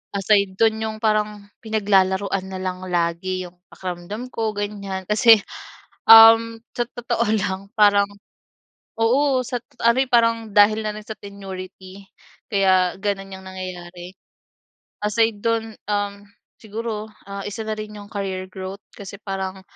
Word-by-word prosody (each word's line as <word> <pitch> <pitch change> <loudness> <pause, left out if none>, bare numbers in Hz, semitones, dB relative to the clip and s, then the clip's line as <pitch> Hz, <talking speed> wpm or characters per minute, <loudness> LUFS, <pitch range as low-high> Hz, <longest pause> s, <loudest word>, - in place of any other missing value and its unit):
aside 200 -1 +2
dun, 220 -1 +3
yung 220 0 -3
parang 210 -1 0 0.2
pinaglalaruan 195 -3 +1
na 190 -1 -6
lang 185 0 -4
lagi 180 +1 -1
yung 175 0 -19
pakiramdam 185 +7 -6
ko 225 -2 -1
ganyan. 200 -2 -4
Kasi, 220 0 +6 0.7
um, 225 0 +9 0.2
sa 240 - +1
totoo 235 -2 -2
lang 195 0 -3
parang 205 -1 +5 0.9
oo 260 +4 +2
sa 245 0 -3
tot - - -32
ano, 235 +2 +5
eh, - - -21
parang 230 -1 +4 0.2
dahil 210 +1 +5
na 215 - -2
rin 215 0 -9
sa 220 - -6
tenurity 190 -1 -9 0.5
kaya 185 -3 +3
ganun 195 -1 -2
yung 190 0 -10
nangyayari. 180 -1 -8 0.9
Aside 225 +1 +1
dun, 225 -1 0 0.2
um, 205 -1 -2 0.4
siguro, 220 0 -5 0.2
ah, 200 0 -5
isa 205 +2 -5
na 220 - -2
rin 215 0 -7
yung 205 0 -11
career 190 -2 -4
growth 190 +1 -7
kasi 200 0 -9
parang, 190 -1 -4
205 Hz, 140 wpm, -22 LUFS, 190-220 Hz, 0.9 s, um